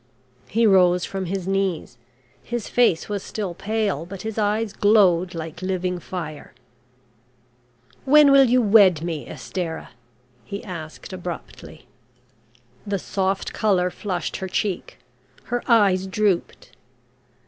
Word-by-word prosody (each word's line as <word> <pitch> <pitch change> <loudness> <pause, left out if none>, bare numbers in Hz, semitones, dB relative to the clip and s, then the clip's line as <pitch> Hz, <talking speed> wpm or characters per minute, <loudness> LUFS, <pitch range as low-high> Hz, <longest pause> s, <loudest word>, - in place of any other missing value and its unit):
He 230 +3 +2
rose 180 -3 +4
from 190 -2 -4
his 190 0 -3
knees, 190 -10 -2 0.4
his 240 -3 -5
face 235 -9 +2
was 205 -2 -3
still 200 -3 -5
pale, 200 -3 -2
but 185 +3 -9
his 220 0 -4
eyes 210 0 0
glowed 185 -5 +3
like 165 +1 -7
living 185 -1 -2
fire. 165 -4 -7 1.5
"When 290 +1 +6
will 275 -1 +7
you 250 0 +3
wed 200 -7 +5
me, 165 -4 -4
Estarah?" 160 +6 -5 0.5
he 200 - -7
asked, 170 -1 -8
abruptly. 180 -2 -8 1.0
The 200 -1 -2
soft 190 +1 -2
colour 185 -4 +1
flushed 180 -4 -4
her 190 - -5
cheek. 190 0 -3 0.5
Her 245 0 -2
eyes 200 -6 +3
drooped. 195 -2 -1
190 Hz, 120 wpm, -23 LUFS, 175-210 Hz, 1.5 s, will